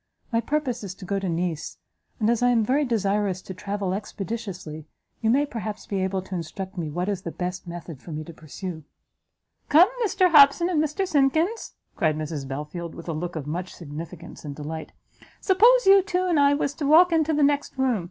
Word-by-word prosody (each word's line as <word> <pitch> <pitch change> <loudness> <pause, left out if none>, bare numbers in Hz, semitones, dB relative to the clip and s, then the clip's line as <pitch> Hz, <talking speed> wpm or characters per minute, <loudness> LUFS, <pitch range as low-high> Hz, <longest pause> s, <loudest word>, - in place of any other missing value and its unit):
My 230 0 +2
purpose 265 -5 -2
is 190 -2 -6
to 190 - -10
go 195 +2 -1
to 195 -2 -3
Nice, 170 -2 -3 0.4
and 215 - +1
as 235 0 +2
I 245 - +4
am 230 -3 +3
very 280 +5 +2
desirous 205 -5 0
to 190 - -7
travel 200 0 -3
expeditiously, 195 -6 -6 0.3
you 220 - +1
may 275 +5 +3
perhaps 215 -6 -6
be 195 -2 -2
able 190 0 -1
to 190 - -10
instruct 185 +3 -5
me 165 -4 -3
what 175 +5 -2
is 200 -3 -2
the 170 - -5
best 180 +1 -5
method 170 -4 -8
for 170 - -10
me 155 0 -4
to 170 - -11
pursue." 160 +2 -7 0.9
"Come, 335 +7 +7
Mr 370 -4 +2
Hobson 300 +3 +7
and 310 -3 +2
Mr 340 +6 -1
Simkins," 320 - +1 0.2
cried 155 -2 +1
Mrs 150 -3 -4
Belfield, 150 +5 -6
with 170 0 -8
a - - -1
look 170 +3 -4
of 155 -3 -4
much 175 +5 -5
significance 165 +1 -9
and 145 -2 -6
delight, 155 +2 -6 0.5
"suppose 465 +6 +5
you 390 0 +8
two 370 -1 -1
and 345 -5 +2
I 285 0 +5
was 285 -1 -1
to 295 -4 -1
walk 340 +4 +7
into 320 -1 +2
the 300 -1 +2
next 285 -1 +1
room? 260 -5 +2
200 Hz, 205 wpm, -25 LUFS, -, 0.9 s, you